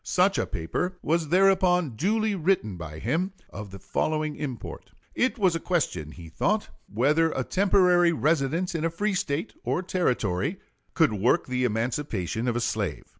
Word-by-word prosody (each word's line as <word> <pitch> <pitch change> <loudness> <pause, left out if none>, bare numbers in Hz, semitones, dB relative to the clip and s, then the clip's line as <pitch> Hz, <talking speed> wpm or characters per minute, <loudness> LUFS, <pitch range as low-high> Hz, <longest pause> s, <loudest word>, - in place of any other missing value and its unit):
Such 190 +2 +2
a - - -1
paper 180 - -3
was 165 0 +1
thereupon 180 -2 +3
duly 215 - +1
written 170 - 0
by 80 -3 -8
him, 165 - -1 0.2
of 105 0 -7
the 95 - -9
following 155 - -1
import: 130 -6 -6 0.2
It 260 +2 +1
was 190 -6 +2
a - - -1
question, 160 - -1
he 85 -2 -11
thought, 205 - -1 0.2
whether 150 +9 +3
a 130 - -1
temporary 180 -1 +4
residence 160 +2 0
in 165 -2 -2
a 165 - +2
free 205 +5 -1
State 160 0 -2
or 180 - -1
Territory 140 - -1 0.4
could 160 -9 +3
work 105 +4 +2
the 125 0 -1
emancipation 115 - -2
of 120 - 0
a 120 - 0
slave. 105 -8 -2
155 Hz, 165 wpm, -26 LUFS, 115-180 Hz, 0.4 s, temporary